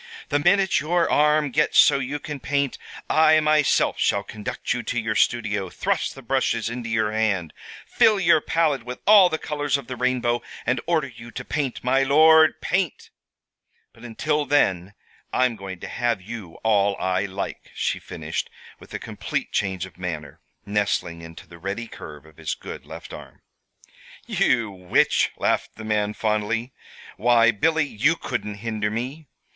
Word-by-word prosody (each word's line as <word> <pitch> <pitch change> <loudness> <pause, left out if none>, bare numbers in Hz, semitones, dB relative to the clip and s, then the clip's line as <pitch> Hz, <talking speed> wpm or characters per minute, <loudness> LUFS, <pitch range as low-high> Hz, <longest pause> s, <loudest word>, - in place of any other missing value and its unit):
"The 145 - +2
minute 190 +4 +3
your 170 +2 +1
arm 150 -1 +3
gets 150 +4 +1
so 140 - +6
you 135 +2 -3
can 150 0 -7
paint, 140 -1 -1 0.3
I 155 0 +5
myself 155 -1 +2
shall 100 - +1
conduct 105 +4 -4
you 125 - -3
to 120 +1 -2
your 110 -1 -1
studio, 105 -4 0
thrust - - -2
the 135 - -11
brushes 115 -2 0
into 120 -1 -5
your 110 -1 0
hand, 105 -7 0 0.3
fill 215 -2 +3
your 165 -4 +4
palette 155 -5 +1
with 125 +1 -6
all 200 -3 +7
the 160 - -1
colors 145 -2 -1
of 140 - -9
the 125 - -6
rainbow, 125 -1 0 0.2
and 120 0 0
order 165 -4 +2
you 120 -2 -12
to 125 +1 -7
paint, 140 -4 -3
my 130 +2 +2
lord, 155 +3 +5
paint! 180 -4 -2 0.8
But - - -18
until 150 +6 -1
then 95 -9 +1 0.4
I'm 130 -2 +2
going 95 -3 -8
to - - -6
have 120 -3 -1
you 100 -3 -9
all 100 -2 +3
I 95 +2 0
like," 100 0 -6
she - - -1
finished, - - -5 0.3
with - - -16
a - - 0
complete - - -4
change 95 -3 -1
of 90 -1 -16
manner, 80 -6 -6 0.2
nestling 100 -5 -1
into 80 0 -11
the 85 - -14
ready 100 +6 -4
curve 75 -9 -11
of 80 -1 -19
his 80 -2 -3
good - - -9
left - - -10
arm. - - -12 0.8
"You 115 -5 +1
witch!" 90 -2 +2
laughed - - 0
the 110 - -9
man, 105 -1 0
fondly. 110 +3 -1 0.4
"Why, 115 0 +4
Billy, 160 +8 +1
you 145 +5 +1
couldn't 120 -9 -4
hinder 110 -2 -1
me. 130 +8 -5
120 Hz, 165 wpm, -23 LUFS, 105-145 Hz, 0.8 s, all